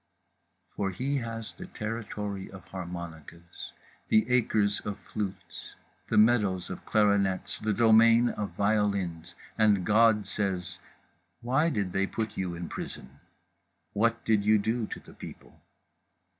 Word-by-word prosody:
For 100 -1 -1
he 135 +9 -2
has 115 -3 -5
the - - -9
territory 105 -3 -5
of 95 -2 -11
harmonicas, 85 -2 -8 0.4
the 110 0 +4
acres 110 -4 +2
of 105 -1 -5
flutes, 100 -3 -6 0.3
the - - +1
meadows 105 -6 +3
of 90 - -7
clarinets, 100 -3 +1
the 110 - -1
domain 115 +2 +5
of 105 -3 -3
violins. 100 -5 0 0.2
And 105 -4 +4
God 110 -1 +4
says: 95 -3 -3 0.6
Why 135 +7 +2
did 100 - -2
they 95 0 +1
put 110 -1 -4
you 90 -2 -3
in 85 0 -5
prison? 70 -2 -8 0.7
What 115 +2 +1
did 110 -2 +3
you 110 +1 +5
do 110 +2 -1
to - - -7
the - - -16
people? - - -12
105 Hz, 130 wpm, -28 LUFS, 95-110 Hz, 0.7 s, domain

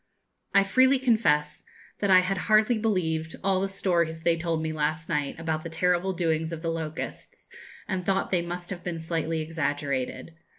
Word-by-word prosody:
I 200 - +7
freely 260 +7 +4
confess 185 - +1 0.4
that 200 - 0
I 185 -1 +8
had 185 +1 -1
hardly 215 +2 +4
believed 165 -7 -1
all 190 -1 +2
the 195 - 0
stories 170 -4 0
they 170 -1 +3
told 165 -1 -1
me 160 0 -2
last 155 +1 -1
night 150 -2 -2
about 160 -1 -2
the 165 - -6
terrible 180 +3 +1
doings 160 -2 0
of 165 0 -6
the 165 - 0
locusts, 160 -1 -6 0.4
and 190 -2 -2
thought 195 +1 0
they 180 -2 +2
must 175 +1 -6
have 180 -2 -6
been 170 -2 -4
slightly 160 0 -2
exaggerated. 145 -2 -2
165 Hz, 175 wpm, -27 LUFS, 160-190 Hz, 0.4 s, I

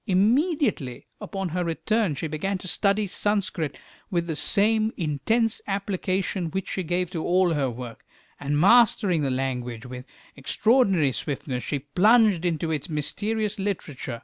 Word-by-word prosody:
Immediately 220 - +1
on 195 -2 -4
her 180 +2 -1
return 180 +2 0
she 150 - -4
began 170 +6 -2
to 185 - -9
study 200 +3 +1
Sanskrit 185 -8 -1 0.3
with 170 -4 0
the 165 -2 -3
same 215 +5 +2
intense 195 - 0
application 195 -2 -2
which 190 +3 -4
she 190 - -2
gave 180 +1 -1
to 165 -4 -3
all 180 -1 +3
her 140 -4 0
work, 120 -1 -8 0.4
and 145 +1 -1
mastering 200 -3 +4
the 140 - 0
language 125 -3 -3
with 125 +1 -8 0.3
extraordinary 195 - +2
swiftness, 130 -2 -4
she 145 - -2
plunged 190 - +3
into 165 -1 -1
its 155 +2 -3
mysterious 205 +8 -2
literature. 160 - -4
180 Hz, 145 wpm, -25 LUFS, 145-205 Hz, 0.4 s, mastering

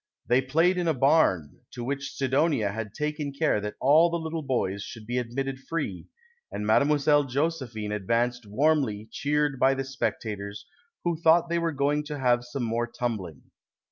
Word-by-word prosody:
They 125 +2 +3
played 165 +8 +2
in 175 - -1
a 160 - +2
barn, 130 - +2
to 120 - -6
which 140 +2 -4
Sidonia 135 -5 +1
had 105 0 -6
taken 150 -1 -2
care 140 -6 +1
that 105 +1 -5
all 155 +6 +5
the 170 - -1
little 160 0 -4
boys 120 -8 -1
should 110 +1 -9
be 120 +3 -1
admitted 130 +3 -3
free, 135 - -4 0.4
and 105 - -4
Mile. 110 +6 +4
Josepliine 145 -5 +1
advanced 120 +3 -1
warmly 115 -3 +1
cheered 145 -2 0
by 135 +1 +4
the 135 - -2
specta 125 -4 -3
tors, 100 +1 -8 0.2
" 350 - -46
wlio 170 -2 -1
thought 165 +1 +4
they 170 0 +1
were 165 -1 0
going 145 +1 0
to 150 -1 -5
have 125 -2 +2
some 120 +1 -4
more 115 +1 -1
tumbling.' 110 - -4
135 Hz, 175 wpm, -27 LUFS, 115-150 Hz, 0.4 s, all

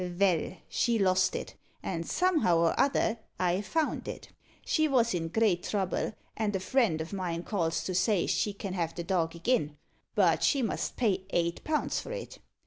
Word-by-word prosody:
Vell, 180 0 +1
she 235 -1 +1
lost 185 -2 +3
it; - - -5 0.3
and, 165 -2 -3
somehow 325 - +3
or 165 0 +3
other, 235 -4 +2 0.2
I 180 +1 +1
found 310 +10 -1
it. - - -7 0.4
She 315 -1 +2
vos 240 -6 +3
in 165 -2 -1
great 185 -1 +2
trouble, 195 +1 -1 0.2
and 210 -2 -1
a - - +1
friend 215 -5 +2
o' 170 +5 -7
mine 175 -3 -3
calls 170 -6 -1
to 185 - -3
say 185 0 +2
she 210 - +1
can 200 -1 -6
have 170 -3 -2
the 170 - -4
dog 170 -3 0
agin, 170 - 0 0.4
but - - +4
she 275 -3 +3
must 225 - -2
pay 195 -6 +1
eight 170 0 0
pound 305 -1 0
for - - -3
it. - - -6
190 Hz, 180 wpm, -30 LUFS, 170-230 Hz, 0.4 s, but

